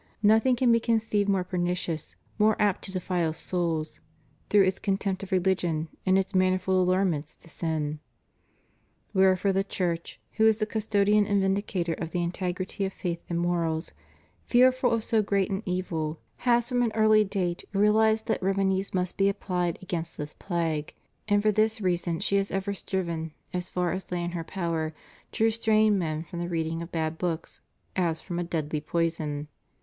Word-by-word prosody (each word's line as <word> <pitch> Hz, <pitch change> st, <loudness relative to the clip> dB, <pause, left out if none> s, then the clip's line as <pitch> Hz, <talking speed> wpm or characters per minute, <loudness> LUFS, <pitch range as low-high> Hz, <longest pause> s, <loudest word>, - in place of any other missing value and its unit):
Nothing 220 Hz, +5 st, +5 dB
can 245 Hz, 0 st, +3 dB
be 230 Hz, -, +5 dB
conceived 220 Hz, -3 st, +1 dB
more 195 Hz, -2 st, +2 dB
pernicious, 175 Hz, -3 st, -2 dB, 0.2 s
more 215 Hz, 0 st, +4 dB
apt 205 Hz, -3 st, +2 dB
to -, -, -6 dB
defile 180 Hz, -3 st, -1 dB
souls, 165 Hz, -2 st, -2 dB, 0.5 s
through 205 Hz, -1 st, +6 dB
its 190 Hz, 0 st, 0 dB
contempt 195 Hz, -1 st, -1 dB
of 195 Hz, 0 st, -8 dB
religion, 175 Hz, -4 st, +1 dB, 0.2 s
and 190 Hz, 0 st, +5 dB
its 195 Hz, +2 st, -1 dB
manifold 185 Hz, 0 st, +2 dB
allurements 180 Hz, -5 st, 0 dB
to -, -, -20 dB
sin. 155 Hz, -2 st, -3 dB, 1.1 s
Wherefore 190 Hz, 0 st, +3 dB
the 195 Hz, +1 st, +2 dB
Church, 175 Hz, -4 st, -3 dB, 0.2 s
who 220 Hz, 0 st, +5 dB
is 220 Hz, -1 st, +4 dB
the 215 Hz, -, 0 dB
custodian 210 Hz, -1 st, +2 dB
and 205 Hz, -1 st, +2 dB
vindicator 190 Hz, -3 st, 0 dB
of 165 Hz, 0 st, -5 dB
the 175 Hz, 0 st, -1 dB
integrity 180 Hz, +2 st, -3 dB
of 190 Hz, 0 st, -2 dB
faith 170 Hz, -2 st, -3 dB
and 170 Hz, -1 st, -1 dB
morals, 170 Hz, -2 st, -1 dB, 0.6 s
fearful 255 Hz, +1 st, +4 dB
of 230 Hz, -1 st, 0 dB
so 220 Hz, -1 st, +2 dB
great 200 Hz, -1 st, 0 dB
an 195 Hz, +1 st, -1 dB
evil, 165 Hz, -4 st, -2 dB, 0.2 s
has 240 Hz, -1 st, +2 dB
from 245 Hz, -1 st, +1 dB
an 235 Hz, -2 st, +1 dB
early 215 Hz, -1 st, +5 dB
date 185 Hz, -4 st, -2 dB
realized 220 Hz, +2 st, +3 dB
that -, -, -1 dB
remedies 190 Hz, 0 st, 0 dB
must 180 Hz, 0 st, -1 dB
be 195 Hz, 0 st, +5 dB
applied 180 Hz, -4 st, -1 dB
against 170 Hz, -2 st, -4 dB
this 150 Hz, 0 st, -5 dB
plague; 165 Hz, -4 st, -2 dB, 0.3 s
and 205 Hz, -1 st, +3 dB
for 215 Hz, -, +4 dB
this 215 Hz, +1 st, +2 dB
reason 175 Hz, -3 st, 0 dB
she 200 Hz, -, +1 dB
has 195 Hz, 0 st, 0 dB
ever 195 Hz, +1 st, -2 dB
striven, 170 Hz, -5 st, -3 dB, 0.2 s
as 180 Hz, 0 st, -3 dB
far 180 Hz, -1 st, 0 dB
as 185 Hz, +2 st, -5 dB
lay 175 Hz, -1 st, -1 dB
in 175 Hz, -, -2 dB
her 170 Hz, -1 st, -4 dB
power, 165 Hz, -3 st, -2 dB, 0.4 s
to -, -, 0 dB
restrain 220 Hz, -2 st, +3 dB
men 155 Hz, -2 st, -2 dB
from 170 Hz, 0 st, -7 dB
the 175 Hz, 0 st, -3 dB
reading 165 Hz, -1 st, -2 dB
of 170 Hz, -, -7 dB
bad 160 Hz, -1 st, -2 dB
books, 170 Hz, -2 st, -3 dB, 0.3 s
as 170 Hz, -3 st, 0 dB
fram 175 Hz, -2 st, -5 dB
a -, -, 0 dB
deadly 155 Hz, -3 st, -2 dB
poison. 155 Hz, -2 st, -2 dB
185 Hz, 175 wpm, -27 LUFS, 170-205 Hz, 1.1 s, through